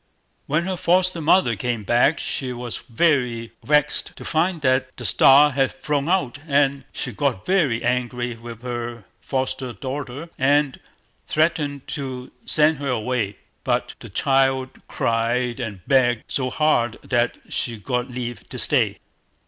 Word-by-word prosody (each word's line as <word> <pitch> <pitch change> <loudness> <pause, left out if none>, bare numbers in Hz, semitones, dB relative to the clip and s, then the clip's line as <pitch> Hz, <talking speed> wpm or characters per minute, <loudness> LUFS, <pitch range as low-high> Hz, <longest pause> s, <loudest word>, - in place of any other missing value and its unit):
When 155 +4 +1
her 190 -1 -2
foster 180 0 +2
mother 155 -6 +4
came 120 -1 -2
back, 120 +8 +3
she 130 -2 -3
was 120 -1 -5
very 120 -3 0
vexed 150 0 +1
to - - -10
find 170 +2 +1
that 130 -1 +1
the 120 - -7
star 140 +9 +6
had 135 0 +1
flown 145 +2 -2
out, 160 -8 0
and 140 -1 +2
she - - -4
got 135 -9 -1
very 155 -12 +2
angry 125 -1 -1
with 115 0 -10
her 120 -2 -5 0.2
foster 130 -2 -2
daughter, 135 +6 -6
and 140 0 +2 0.5
threatened 150 -3 0
to 130 -3 -5 0.2
send 155 -1 +3
her 140 -1 -3
away; 120 -4 -1 0.3
but - - 0
the - - -10
child 135 -1 +2 0.2
cried 120 +2 0
and 105 -7 -6
begged 120 -4 +3
so 130 -2 -1
hard 120 -6 +1
that 120 0 0
she 115 -2 -2
got 125 +5 -2
leave 120 -3 -6
to - - -7
stay. - - +2
130 Hz, 145 wpm, -22 LUFS, 120-145 Hz, 0.5 s, star